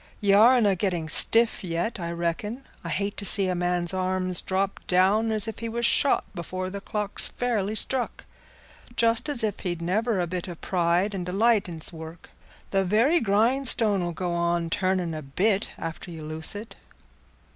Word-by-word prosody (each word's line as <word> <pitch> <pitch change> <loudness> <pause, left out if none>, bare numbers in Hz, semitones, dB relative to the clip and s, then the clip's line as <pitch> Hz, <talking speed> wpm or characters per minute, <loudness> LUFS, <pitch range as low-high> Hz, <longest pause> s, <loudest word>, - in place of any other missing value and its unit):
Ye 200 -1 +2
arena 220 -1 +5
getting 175 -4 -2
stiff 225 +6 +4
yet, 175 +5 -3
I 170 -1 -4
reckon. 170 +9 -3 0.2
I - - -6
hate 200 +1 -3
to - - -3
see 195 -1 +5
a 185 - 0
man's 175 0 0
arms 185 -1 -1
drop 195 +1 -2
down 200 +5 +2
as 215 0 +3
if 225 - -6
he 230 0 -4
was 235 +1 -2
shot, 280 +3 +3
before 185 +2 -5
the 200 0 -6
clock's 210 0 -1
fairly 220 -4 -2
struck, 255 +2 -2 0.7
just 230 +4 +2
as 245 -6 0
if 215 -2 -2
he'd 175 -2 -4
never 205 +5 0
a 175 - 0
bit 180 +1 -5
o' 175 - -6
pride 175 +4 0
and 190 -2 -4
delight 200 +3 +1
in 165 -2 -8
's - - +2
work. 160 +1 -11 0.4
The 195 -1 +2
very 230 - +3
grindstone 225 -1 +2
'ull 175 0 -2
go 175 +1 -3
on 170 -1 -1
turning 185 -3 0
a 155 - -5
bit 195 +9 0
after 165 +2 -7
you 160 -2 -8
loose 160 +4 -1
it." 215 +3 -8
190 Hz, 180 wpm, -25 LUFS, 175-220 Hz, 0.7 s, arena